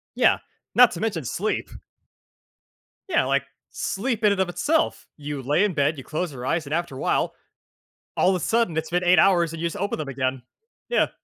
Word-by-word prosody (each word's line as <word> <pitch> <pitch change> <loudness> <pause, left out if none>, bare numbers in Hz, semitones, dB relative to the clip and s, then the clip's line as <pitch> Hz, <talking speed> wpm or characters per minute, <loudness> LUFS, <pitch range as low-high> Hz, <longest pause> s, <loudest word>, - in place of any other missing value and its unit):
Yeah, - - +4 0.4
not 250 -1 +7
to 170 - -6
mention 200 -9 -2
sleep. 200 - -2 1.4
Yeah, 360 - +2
like, 140 +1 +1 0.3
sleep 225 +2 -2
in 210 -1 +5
and 195 - -1
of 190 - +1
itself. 295 - 0
You 145 -2 -5
lay 145 +10 +2
in 205 - +1
bed, 145 0 +1
you 135 - -8
close 160 +1 -3
your 125 -2 -7
eyes, 165 +2 0
and 145 - -3
after 170 -4 -2
a 130 - -7
while, - - 0 0.8
all 185 - +4
of 190 - +2
a 180 - -3
sudden 225 -7 +1
it's 160 +1 -2
been 180 +1 0
8 180 -1 +5
hours 175 -3 +4
and 165 - -7
you 170 - 0
just 170 - -3
open 200 -2 -2
them 150 - -4
again. 130 -1 -2 0.5
Yeah. 485 - +2
170 Hz, 210 wpm, -24 LUFS, 145-195 Hz, 1.4 s, not